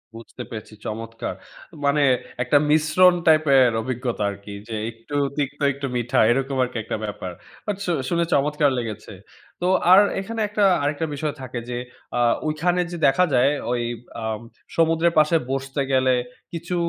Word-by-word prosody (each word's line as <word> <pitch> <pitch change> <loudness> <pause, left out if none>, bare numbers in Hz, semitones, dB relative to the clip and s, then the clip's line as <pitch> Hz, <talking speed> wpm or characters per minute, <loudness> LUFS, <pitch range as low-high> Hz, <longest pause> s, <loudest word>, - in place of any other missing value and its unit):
বুঝতে 115 +2 -9
পেরেছি। 110 -1 -8
চমৎকার! 115 +1 -5 0.5
মানে 140 +1 +3 0.4
একটা 130 +4 +3
মিশ্রণ 160 +4 +5
টাইপের 140 -5 +5
অভিজ্ঞতা 120 -3 -3
আরকি। 100 0 -9
যে 115 - -4 0.2
একটু 115 +6 -9 0.2
তিক্ত 145 0 -2
একটু 140 0 -5
মিঠা 120 +2 0
এরকম 135 +2 0
আরকি 125 -1 -4
একটা 110 - -3
ব্যাপার। 95 -3 -6 0.3
বাট 210 - -1
শু 175 - 0 0.2
শুনে 170 0 +1
চমৎকার 150 +1 +2
লেগেছে। 110 -3 -5 0.5
তো 180 - +1 0.2
আর 190 - +10 0.2
এখানে 225 +4 -6
একটা 210 0 0 0.2
আরেকটা 145 +3 -1
বিষয় 150 +1 -2
থাকে 125 -2 -5
যে, 120 - -3 0.4
আ - - +1 0.3
ওইখানে 175 +4 +1
যে 175 - -5
দেখা 160 +7 +4
যায়, 130 +3 +4 0.2
ওই 120 -1 0 0.4
আ - - -5 0.5
সমুদ্রের 165 +1 +3
পাশে 155 +2 +3 0.2
বসতে 135 +1 -2
গেলে, 130 -1 +3 0.4
কিছু 170 +2 -4
140 Hz, 155 wpm, -23 LUFS, 120-160 Hz, 0.5 s, আর